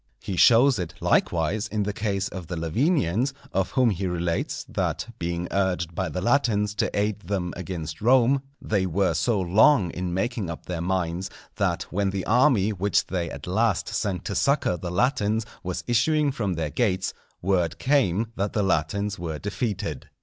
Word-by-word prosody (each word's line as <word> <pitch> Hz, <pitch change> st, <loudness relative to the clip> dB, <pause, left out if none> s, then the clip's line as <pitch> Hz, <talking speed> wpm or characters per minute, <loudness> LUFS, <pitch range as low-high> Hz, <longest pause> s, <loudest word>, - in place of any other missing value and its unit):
He 95 Hz, -, -4 dB
shows 120 Hz, +5 st, +6 dB
it, 85 Hz, -1 st, -4 dB
likewise, 85 Hz, +6 st, +1 dB
in 105 Hz, -1 st, -1 dB
the 105 Hz, +1 st, -2 dB
case 100 Hz, -2 st, -1 dB
of 90 Hz, -3 st, -7 dB
the 85 Hz, -, -4 dB
Lavinians, 120 Hz, -, +1 dB, 0.2 s
of 95 Hz, 0 st, +1 dB
whom 125 Hz, -4 st, +4 dB
he 95 Hz, 0 st, -2 dB
relates, 85 Hz, -1 st, -2 dB
that -, -, -2 dB
being 85 Hz, +1 st, -2 dB
urged 90 Hz, -3 st, 0 dB
by 95 Hz, +2 st, -2 dB
the 90 Hz, -, -3 dB
Latins 105 Hz, -3 st, +2 dB
to -, -, +1 dB
aid 105 Hz, 0 st, 0 dB
them 95 Hz, -4 st, -3 dB
against 85 Hz, -4 st, -6 dB
Rome, 130 Hz, +3 st, +4 dB, 0.2 s
they 100 Hz, -3 st, 0 dB
were 95 Hz, +2 st, +1 dB
so 115 Hz, -5 st, +1 dB
long 95 Hz, -, +4 dB
in 90 Hz, 0 st, -3 dB
making 95 Hz, +1 st, -2 dB
up 85 Hz, -, -7 dB
their 85 Hz, -2 st, -4 dB
minds, 90 Hz, 0 st, -1 dB, 0.3 s
that -, -, 0 dB
when 100 Hz, +2 st, 0 dB
the 95 Hz, -1 st, -3 dB
army 115 Hz, -4 st, +4 dB
which 100 Hz, +1 st, +1 dB
they 85 Hz, -3 st, -2 dB
at -, -, -8 dB
last -, -, +1 dB
sent 95 Hz, -4 st, -2 dB
to 100 Hz, -, -2 dB
succour 140 Hz, -5 st, +2 dB
the 85 Hz, +1 st, -5 dB
Latins 110 Hz, +1 st, +1 dB, 0.2 s
was 90 Hz, 0 st, -4 dB
issuing 145 Hz, +5 st, +2 dB
from 105 Hz, -9 st, -2 dB
their 80 Hz, -2 st, -2 dB
gates, 95 Hz, -6 st, 0 dB, 0.3 s
word 90 Hz, -3 st, +1 dB
came 115 Hz, -6 st, +1 dB
that 100 Hz, +1 st, -2 dB
the 105 Hz, -, +1 dB
Latins 100 Hz, +3 st, 0 dB
were 80 Hz, -3 st, -4 dB
defeated. 105 Hz, -, -3 dB
95 Hz, 175 wpm, -25 LUFS, 90-110 Hz, 0.3 s, shows